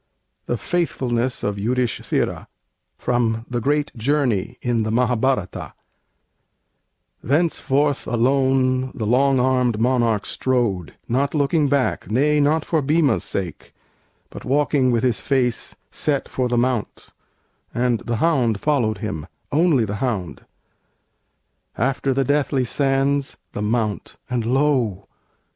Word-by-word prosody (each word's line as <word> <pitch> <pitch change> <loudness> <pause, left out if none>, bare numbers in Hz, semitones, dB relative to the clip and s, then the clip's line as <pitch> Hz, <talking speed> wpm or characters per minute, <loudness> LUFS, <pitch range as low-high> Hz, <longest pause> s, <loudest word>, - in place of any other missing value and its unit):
THE 120 - 0
FAITHFULNESS 130 -7 -1
OF 100 -1 -2
YUDHISTHIRA 120 +2 -1 0.5
From 115 -2 0
'The 120 -1 -2
Great 145 +3 0
Journey,' 125 -4 0
in 120 -2 +1
the 110 - -1
Mahâbhârata 125 -3 0 1.5
Thenceforth 145 -1 +1
alone 130 +1 +2
the 115 -5 -3
long 130 +4 +3
armed 125 -3 +2
monarch 115 -3 +1
strode, 115 -10 -1
Not 140 +5 0
looking 145 0 +2
back, 140 -2 0
nay, 145 +7 +2
not 150 +2 +2
for 160 -2 +1
Bhima's 150 +1 +2
sake, 90 -5 -5 0.6
But - - -9
walking 140 -1 +2
with 120 -1 +1
his 125 -4 +1
face 125 -4 0 0.2
set 145 -3 -1
for 130 -1 -1
the 120 - +1
mount; 120 -2 -1 0.6
And 120 -1 +1
the 120 - -3
hound 120 -6 +1
followed 120 -8 +1
him, 100 -8 -5 0.2
only 150 -6 +3
the 100 0 -4
hound. 105 -8 -3 1.3
After 135 +3 0
the 135 +1 +1
deathly 140 -1 +1
sands, 135 +2 0
the - - -5
Mount; 105 -1 -2
and 120 -2 -1
lo! 125 -7 +1
125 Hz, 120 wpm, -21 LUFS, 115-140 Hz, 1.5 s, long